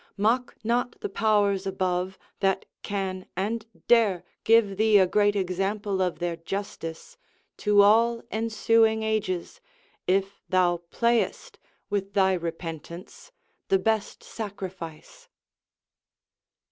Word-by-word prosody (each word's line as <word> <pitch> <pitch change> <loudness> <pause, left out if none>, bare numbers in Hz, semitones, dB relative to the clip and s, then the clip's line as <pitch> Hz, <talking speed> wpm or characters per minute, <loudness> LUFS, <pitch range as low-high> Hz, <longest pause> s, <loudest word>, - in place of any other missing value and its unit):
Mock 235 +5 +1
not 240 +2 0
the - - -3
powers 200 -2 +2
above, 185 0 -1 0.2
that 195 -1 +1 0.2
can 190 -2 -3
and 220 +4 -2 0.2
dare 210 -7 +4 0.2
Give 225 -3 +4
thee 215 0 +5
a 190 - +6
great 205 +2 +2
example 195 +1 -1
of 180 -2 0
their 175 -1 -2
justice 165 -2 -6 0.4
To 205 -1 +5
all 230 +3 +4
ensuing 220 0 +2
ages, 210 -5 -2 0.5
if 195 +2 0
thou 180 -2 +3
playest 235 +3 0 0.3
With 200 -1 -2
thy 190 -1 +4
repentance, 170 - -6 0.4
the 195 - +4
best 220 +2 -1
sacrifice. 190 -7 -8
200 Hz, 110 wpm, -26 LUFS, 185-220 Hz, 0.5 s, a